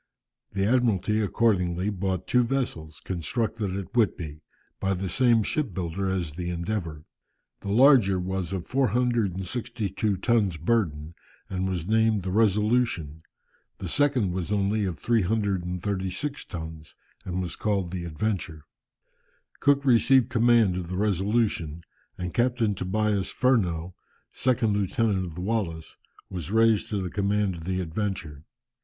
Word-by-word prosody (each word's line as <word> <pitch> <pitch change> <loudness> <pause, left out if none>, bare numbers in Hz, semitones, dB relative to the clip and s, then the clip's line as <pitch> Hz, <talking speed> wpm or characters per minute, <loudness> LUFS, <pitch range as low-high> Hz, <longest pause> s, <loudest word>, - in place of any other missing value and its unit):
The 95 0 0
Admiralty 110 -3 +2
accordingly 95 -3 +1
bought 95 -2 -2
two 125 - +3
vessels, 115 - -3
constructed 95 +3 -2
at 95 0 -7
Whitby, 85 -9 0 0.4
by 95 0 0
the 95 +1 -3
same 120 +1 +3
ship 130 - -2
builder 95 +2 -2
as 90 -5 -2
the 85 +2 -4
Endeavour. 85 -3 -3 0.5
The 100 - -6
larger 115 -4 +5
was 95 -1 -3
of 95 -3 -3
462 115 -4 0
tons 100 -4 +1
burden, 80 -5 0 0.4
and 95 0 -1
was 90 -2 -3
named 110 -2 +2
the 95 - -3
Resolution, 105 -6 +1 0.6
the 95 - -5
second 130 - +2
was 90 +2 -3
only 100 +1 +1
of 90 -4 -3
336 100 - -1
tons, 80 -3 -8 0.3
and 90 0 -3
was 90 -2 -3
called 100 -5 -1
the 90 -2 -4
Adventure. 85 -2 -3 1.0
Cook 140 -1 +3
received 130 0 +5
command 115 -6 +4
of 90 -2 -4
the 90 - -3
Resolution, 100 -5 0 0.4
and 90 -2 -4
Captain 120 -1 +1
Tobias 100 +1 0
Furneaux, 90 -9 +1 0.4
second 115 -4 +1
lieutenant 100 -1 0
of 85 -3 -8
the 90 - -5
Wallis, 90 -6 -2 0.3
was 85 -3 -6
raised 110 0 +3
to 105 - -1
the 90 -2 -4
command 100 -1 +1
of 80 -2 -9
the 95 0 -1
Adventure. 85 -4 -4
95 Hz, 135 wpm, -26 LUFS, 90-110 Hz, 1.0 s, larger